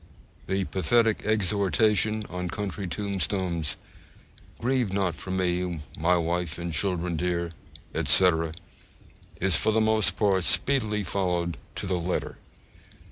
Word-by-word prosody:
The 95 +1 0
pathetic 110 +5 +2
exhortation 105 +1 +1
on 90 0 -4
country 100 +1 -4
tombstones, 90 -4 -2 0.8
'Grieve 125 -3 0
not 95 -3 0
for 95 +3 -7
me, 90 -2 -1
my 90 +3 +2
wife 85 0 -1
and 85 -1 -4
children 90 0 0
dear,' 85 0 -1 0.4
etc., 85 -3 +3 0.9
is 95 -2 +5
for 110 - +2
the 110 - +2
most 110 -4 +3
part 95 -3 +2
speedily 110 -3 +2
followed 90 -2 -1 0.2
to - - -4
the 90 -2 -1
letter. 90 +2 -3
95 Hz, 120 wpm, -26 LUFS, 85-105 Hz, 0.9 s, is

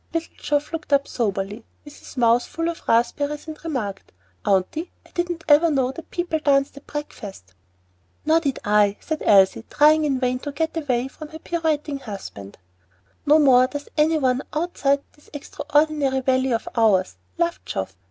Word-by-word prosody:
Little 330 0 -2
Geoff 295 +2 -2
looked 315 -2 -5
up 280 0 +3
soberly, 205 -1 -2 0.2
with 295 - -12
his - - -13
mouth 235 0 +4
full 330 0 -3
of 335 - -6
raspberries, 285 +6 +1
and 310 -1 -9
remarked, 245 -12 -4 0.3
"Aunty, 200 - 0
I - - -21
didn't 345 -1 -3
ever 310 +3 +6
know 265 -4 +1
that 330 +4 -11
people 345 -3 -2
danced 275 -2 +2
at 280 - -14
breakfast." 205 - -8 0.7
"No 315 - +3
more 325 - +6
did 280 -6 -2
I," 205 -1 +3
said 315 -2 -4
Elsie, 195 +1 +5
trying 305 +1 +5
in 270 -3 0
vain 250 0 0
to 290 - -5
get 320 +3 -2
away 260 -6 -1
from 305 +3 -10
her 315 - -10
pirouetting 310 -4 -2
husband. 195 - -9 0.7
"No 300 +2 +7
more 255 -4 +6
does 290 +2 -7
any 315 +1 +3
one 260 -3 +1
outside 285 -4 0
this 295 - -23
extraordinary 290 -1 0
valley 260 0 +1
of 230 0 -1
ours," 210 -5 +2 0.2
laughed 340 0 -1
Geoff. 95 -1 -4
280 Hz, 170 wpm, -23 LUFS, 240-310 Hz, 0.7 s, No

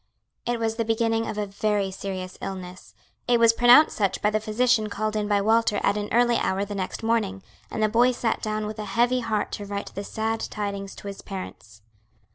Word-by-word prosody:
It 240 -1 0
was 225 0 -1
the 230 - +1
beginning 225 0 0
of 210 - -4
a 210 - -1
very 200 0 -1
serious 185 -1 -5
illness. 185 -1 -7 0.3
It 240 -1 +4
was 230 -1 +6
pronounced 245 +6 +6
such 200 -3 0
by 210 - +1
the 215 - +1
physician 220 0 +1
called 215 +1 -2
in 210 -1 -1
by 205 -1 +2
Walter 220 0 +2
at 200 - +3
an 210 0 -3
early 240 0 +3
hour 195 +2 0
the 205 - -6
next 190 +2 -4
morning, 215 -4 0 0.3
and 220 - -2
the - - +5
boy 235 +4 +4
sat 240 -2 -1
down 215 0 -2
with 215 +1 -6
a 210 - -4
heavy 245 +2 +3
heart 220 -3 -1
to 205 - -5
write 200 0 -5
the 200 - -5
sad 220 +2 -2
tidings 200 -2 -4
to - - -10
his 200 -1 -7
parents. 110 - -9
215 Hz, 215 wpm, -25 LUFS, 200-225 Hz, 0.3 s, was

